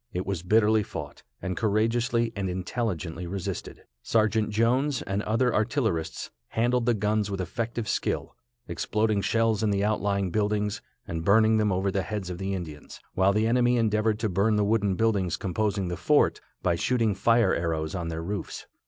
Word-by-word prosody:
It 90 +1 -2
was 95 -4 -2
bitterly 110 +3 +3
fought, 100 - -7 0.2
and 95 -1 -2
courageously 115 +2 +1
and 95 -2 -2
intelligently 90 -3 -3
resisted. 95 0 -5 0.2
Sergeant 110 - +1
Jones 125 +5 +1
and 95 +1 -2
other 115 +4 +1
artillerists 110 - -1 0.2
handled 120 +1 0
the 120 - +4
guns 105 0 0
with 100 -1 -3
effective 110 +5 -3
skill, - - -2 0.3
exploding 105 -1 0
shells 115 0 +1
in 110 - +1
the 100 0 +1
outlying 100 -3 0
buildings, 105 0 0 0.3
and 80 -1 -4
burning 110 +3 +4
them 105 -1 +2
over 95 +1 0
the 95 - 0
heads 100 -3 -4
of 90 - -6
the 95 0 -2
Indians, 80 -5 -8
while 95 +1 +3
the 105 +2 +1
enemy 120 +1 +3
endeavored 110 -1 +1
to 110 - +1
burn 100 +3 +2
the 105 -1 +2
wooden 100 -2 +1
buildings 100 -5 +1
composing 100 -1 -1
the 85 -1 -3
fort, - - +2 0.2
by 85 - +2
shooting 115 +4 +1
fire 115 0 +3
arrows 80 -2 -1
on 85 -3 -3
their 80 0 -4
roofs. 100 +4 -5
105 Hz, 170 wpm, -27 LUFS, 95-110 Hz, 0.3 s, the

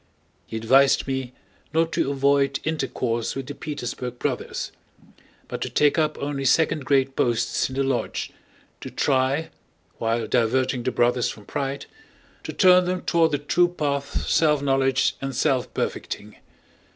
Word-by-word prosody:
He 110 - -5
advised 135 +5 +4
me 130 -2 -3 0.4
not 165 0 +2
to - - 0
avoid 140 0 +2
intercourse 130 -7 -2
with 135 -1 -4
the 145 - -6
Petersburg 125 -4 -5
Brothers, - - -3 0.8
but - - -6
to - - -2
take 150 +2 +3
up 155 -1 0
only 140 -1 -3
second 150 +1 +2
grade 135 -1 +2
posts 120 +1 +1
in 130 - -7
the 135 - +1
lodge, 130 -4 -2 0.5
to - - -7
try, 135 +3 0 0.5
while 115 +1 0
diverting 125 +1 +1
the 130 +2 -1
Brothers 120 0 +2
from 105 - -9
pride, 140 +3 -3 0.6
to - - -4
turn 180 -1 +5
them 180 0 -1
toward 165 -1 +3
the 145 - 0
true 165 +5 +2
path 140 -5 -2
self 150 -3 +3
knowledge 135 -1 +2
and 135 -1 -4
self 130 -1 +1
perfecting. 105 +1 -4
135 Hz, 150 wpm, -24 LUFS, 125-145 Hz, 0.8 s, turn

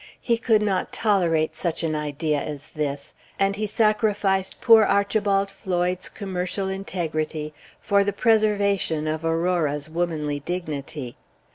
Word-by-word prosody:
He 235 -2 0
could 220 -3 +3
not 195 -3 0
tolerate 170 -7 +1
such 165 0 -3
an 160 -1 0
idea 150 0 -1
as 145 -1 -7
this; 145 -2 -4 0.2
and 195 0 +2
he 215 +1 -2
sacrificed 210 -3 +1
poor 225 -2 +7
Archibald 200 -1 +1
Floyd's 180 -2 -2
commercial 190 0 -3
integrity 160 -5 -3 0.3
for 200 0 +2
the 205 - 0
preservation 200 -7 +2
of 155 +1 -2
Aurora's 165 -3 0
womanly 155 -4 -1
dignity. 145 -5 -5
180 Hz, 125 wpm, -24 LUFS, 155-200 Hz, 0.3 s, poor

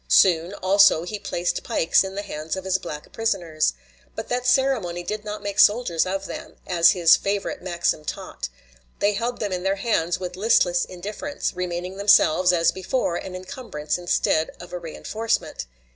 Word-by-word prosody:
Soon, 175 +1 +4
also, 195 -3 +5
he 210 +4 -5
placed 175 -3 -2
pikes 165 - +2
in 190 0 -6
the 205 - -3
hands 155 -4 -5
of 190 - -6
his 190 0 +1
black 150 -5 -8
prisoners. 175 -9 0 0.4
But 220 - -6
that 250 0 -1
ceremony 245 -10 +1
did 210 +3 -4
not 210 0 -6
make 200 -1 -3
soldiers 205 -7 +4
of 195 +1 -3
them, - - -8
as 170 0 +5
his 175 -3 +6
favorite 200 0 -2
maxim 170 -4 -1
taught. 145 - -6 0.5
They 205 +1 +2
held 235 +4 -3
them 210 -3 -2
in 180 -1 -2
their 195 +1 0
hands 190 -5 0
with 180 -1 -5
listless 180 -4 +3
indifference, 210 +11 -5
remaining 180 +1 -4
themselves, 185 -3 +5
as 170 -2 +3
before, 190 0 -2
an 185 - -7
incumbrance 185 - -5
instead 160 -2 +1
of 175 0 -11
a 180 - -3
reënforcement. 215 - -3
185 Hz, 170 wpm, -23 LUFS, 175-205 Hz, 0.5 s, his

